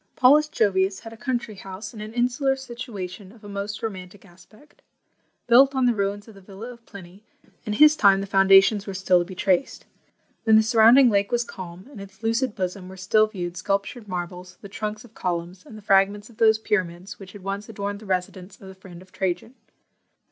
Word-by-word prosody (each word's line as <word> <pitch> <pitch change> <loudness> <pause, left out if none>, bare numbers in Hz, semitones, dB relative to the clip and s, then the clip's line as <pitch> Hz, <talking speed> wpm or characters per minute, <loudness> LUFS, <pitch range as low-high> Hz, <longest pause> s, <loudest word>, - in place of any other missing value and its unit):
Paulus 295 +4 +5
Jovius 195 -5 0
had 225 0 -10
a - - -11
country 240 -2 -3
house, 195 +2 -9
in 215 - -9
an 215 +1 -7
insular 250 +3 0
situation, 215 -7 -8
of 225 0 -19
a - - -10
most 200 +1 -5
romantic 190 -2 -7
aspect. 195 +10 -21 0.6
Built 265 +3 +5
on 260 -1 +2
the 245 - +3
ruins 205 0 -3
of 220 - -13
the 195 - -16
villa 205 +6 -10
of 235 -1 -19
Pliny, 195 0 -13 0.4
in 210 - -1
his 300 +7 +6
time 195 -7 +4
the 195 - -3
foundations 195 +1 +4
were 195 - -5
still 185 -1 +3
to 175 - -2
be 185 +1 -10
traced. 190 +7 0 0.6
When 220 -1 +5
the 220 - +6
surrounding 235 +3 +6
lake 200 -1 +1
was 240 0 +1
calm, 185 -2 -10
in 215 - -10
its 195 +1 -13
lucid 230 +1 0
bosom 185 -1 -4
were 190 - -11
still 215 +4 +2
viewed 180 -4 -6
sculptured 200 +4 -3
marbles, 180 0 -6
the 200 - -10
trunks 215 +2 -5
of 230 - -19
columns, 175 0 -4
and 215 - -11
the 215 - -13
fragments 200 +2 +2
of 220 - -21
those 220 -1 +4
pyramids 190 -4 -3
which 190 -2 -12
had 205 -3 -12
once 200 +2 -5
adorned 200 -1 -5
the 215 - -13
residence 185 +1 -4
of 190 - -12
the - - -10
friend 185 -2 -13
of 185 - -24
Trajan. 190 +5 -3
200 Hz, 205 wpm, -24 LUFS, 190-225 Hz, 0.6 s, his